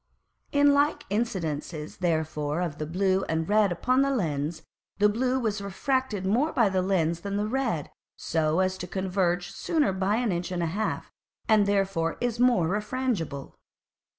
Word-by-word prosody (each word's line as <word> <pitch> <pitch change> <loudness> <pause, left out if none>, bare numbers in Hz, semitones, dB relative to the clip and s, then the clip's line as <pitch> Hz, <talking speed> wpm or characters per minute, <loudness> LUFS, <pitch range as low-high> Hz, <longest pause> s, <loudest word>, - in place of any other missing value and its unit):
In 285 0 +5
like 285 +2 +1
Incidences 165 -8 -3
therefore 160 -3 -1
of 170 -5 -3
the 155 - -3
blue 190 +3 +1
and 160 0 0
red 210 -2 +3
upon 255 +9 +2
the 275 - +2
Lens, 160 - -1 0.3
the 210 - +5
blue 250 +5 +1
was 215 -4 -1
refracted 210 +1 -1
more 245 +11 +2
by 230 -5 +3
the 190 -1 +1
Lens 170 -3 +1
than 200 +2 -3
the 205 - 0
red, 225 - -1 0.2
so 160 +1 0
as 185 0 0
to 180 - -5
converge 180 -1 -1
sooner 300 - 0
by 190 +2 +1
an 235 -2 0
Inch 175 +1 -2
and 175 -1 -1
a 165 0 -2
half, 215 +2 -2 0.4
and 215 -2 +4
therefore 195 -5 0
is 240 -2 -1
more 245 -9 +4
refrangible. 205 - -2
190 Hz, 165 wpm, -27 LUFS, 170-225 Hz, 0.4 s, In